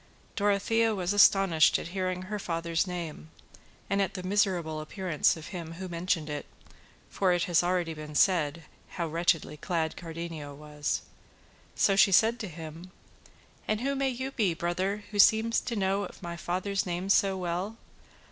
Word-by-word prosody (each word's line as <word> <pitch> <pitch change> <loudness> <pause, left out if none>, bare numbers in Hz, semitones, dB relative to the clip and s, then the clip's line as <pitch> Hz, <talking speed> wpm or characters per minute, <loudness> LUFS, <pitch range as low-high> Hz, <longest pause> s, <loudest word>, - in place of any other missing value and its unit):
Dorothea 210 +2 +2
was 185 0 -1
astonished 195 -5 +5
at - - -6
hearing 185 0 -2
her 210 +2 -4
father's 165 0 -1
name, 165 - -6 0.6
and 200 0 +1
at 195 - -1
the 185 - -5
miserable 180 -5 0
appearance 170 -1 0
of 155 - -9
him 170 -3 -6
who 185 +2 -6
mentioned 170 -2 -1
it, 150 -1 -5 0.6
for 185 -2 +1
it 175 0 +1
has 175 -4 +3
been 175 - 0
already 165 -4 -2
said 165 -3 +2 0.3
how 170 - 0
wretchedly 165 -1 0
clad 160 0 -2
Cardenio 165 -3 -7
was; 150 0 -3 0.7
so 195 - +3
she 195 0 +6
said 225 +5 +4
to 215 - -4
him: 165 +1 -9 0.8
"And 215 +1 0
who 275 +2 0
may 270 -1 0
you 260 +1 -4
be, 205 -10 +1
brother, 185 +5 -2
who 205 - -4
seem 220 +3 +6
to 235 +1 0
know 195 -1 0
my 170 -2 -6
father's 185 +4 -1
name 180 +1 -3
so 195 -1 +3
well? 180 +5 -3
180 Hz, 160 wpm, -29 LUFS, 165-200 Hz, 0.8 s, she